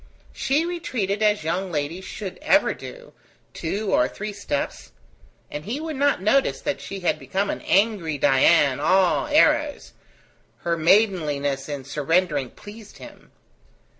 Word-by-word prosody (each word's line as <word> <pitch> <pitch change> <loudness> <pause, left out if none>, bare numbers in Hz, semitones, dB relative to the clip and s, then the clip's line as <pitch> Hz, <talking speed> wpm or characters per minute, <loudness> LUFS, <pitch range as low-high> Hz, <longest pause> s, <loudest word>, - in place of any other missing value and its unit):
She 295 +5 0
retreated 230 - -3
as 210 -4 +2
young 180 +4 -2
ladies 160 +5 -3
should 195 -4 -7
ever 300 -1 +3
do, - - -11 0.4
two 195 +5 -3
or 125 - +4
three 210 +8 -6
steps, 200 -8 -4 0.6
and 150 0 -5
he 235 - -4
would 315 -1 -5
not 280 -8 +1
notice 265 +7 +2
that 290 - -3
she 195 -1 -7
had 170 -3 0
become 190 +9 -2
an - - -6
angry 195 -7 +1
Dian, 135 0 +4
all 185 +4 +2
arrows: 300 0 +2 0.7
her 170 0 0
maidenliness 155 -7 +1
in 145 -2 -5
surrendering 150 0 0
pleased 210 - -13
him. - - -14
190 Hz, 135 wpm, -23 LUFS, 155-225 Hz, 0.7 s, or